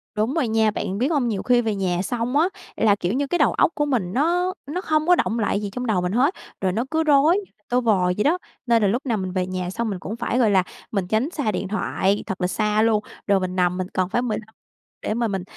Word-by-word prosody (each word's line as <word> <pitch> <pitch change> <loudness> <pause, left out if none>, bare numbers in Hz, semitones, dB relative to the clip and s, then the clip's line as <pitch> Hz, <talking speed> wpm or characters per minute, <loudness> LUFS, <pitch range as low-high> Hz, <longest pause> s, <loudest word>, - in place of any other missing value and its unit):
Đúng 220 +6 0
rồi 305 -8 +1
nha, 220 -1 +2
bạn 195 -1 -3
biết 255 +5 +1
hông, 275 -6 +1
nhiều 205 -4 -2
khi 245 -1 +4
về 220 -3 -1
nhà 180 -2 0
xong 245 +6 -1
á 340 +5 +3 0.3
là, 210 -2 +3
kiểu 185 +1 -2
như, 280 +2 0
cái 350 - 0
đầu - - +3
óc - - +3
của 295 - +1
mình 225 -10 -1
nó 355 +6 +1
nó 355 +6 -3
không 310 -1 0
có 360 - +7
đọng 230 -7 0
lại 205 -1 0
gì 205 - -3
trong 250 +3 -4
đầu 210 -6 +1
mình 180 +1 -1
hết, 270 - +3 0.3
rồi 190 -1 +1
nó 230 +6 -1
cứ 320 0 +2
rối 300 +3 +5
như 410 - -3
là 210 - -40
tơ 250 +1 +2
vò 205 -6 +2
vậy 210 - +1
đó. 330 +5 +3 0.3
Nên 230 -2 +3
là 205 - +3
lúc 245 +8 -1
nào 230 -4 0
mình 185 -1 -3
về 185 -1 -1
nhà 185 -1 -3
xong 230 +3 -2
mình 190 -3 -4
cũng 210 +6 -5
phải, 235 +1 -1
gọi 220 -4 +4
là, 190 -2 +4 0.3
mình 195 -4 -1
tránh 220 +8 +1
xa 275 -11 -1
điện 195 - -3
thoại 200 -1 0
thật 190 0 -5
là 180 - +2
xa 210 +3 +1
luôn, 220 -2 +2 0.2
rồi 200 -1 +4
mình 185 0 -3
nằm 180 0 +1
mình 185 0 -2
cần 185 0 0
phải 240 - +1
15 220 -2 -4 0.5
để - - -2
mà 235 0 0
mình, 195 -3 -3
220 Hz, 280 wpm, -23 LUFS, 195-255 Hz, 0.5 s, có